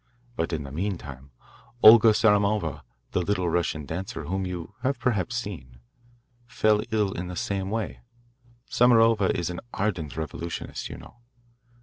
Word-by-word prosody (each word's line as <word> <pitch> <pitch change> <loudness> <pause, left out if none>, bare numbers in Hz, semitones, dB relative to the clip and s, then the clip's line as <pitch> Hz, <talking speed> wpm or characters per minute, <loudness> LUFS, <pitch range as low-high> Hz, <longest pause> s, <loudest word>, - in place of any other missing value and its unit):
But 80 - -2
in 80 -3 -2
the 70 - -9
meantime 75 -6 -5 0.5
Olga 115 +1 +9
Samarova, 105 -6 +2 0.3
the 95 - 0
little 90 -1 0
Russian 80 -3 -1
dancer, 90 +3 -5
whom 95 +5 -2
you 90 0 -6
have 135 +1 0
perhaps 120 -2 -1
seen, 80 - -6 0.7
fell 110 -2 +2
ill 105 -3 +1
in 90 -1 -5
the 90 - -6
same 95 +1 -2
way. 110 0 -3 0.7
Samarova 115 -4 +4
is 85 0 -2
an 90 - -5 0.2
ardent 90 -9 -2
revolutionist, 80 +2 -5
you - - -7
know. - - -14
95 Hz, 140 wpm, -26 LUFS, 80-110 Hz, 0.7 s, Olga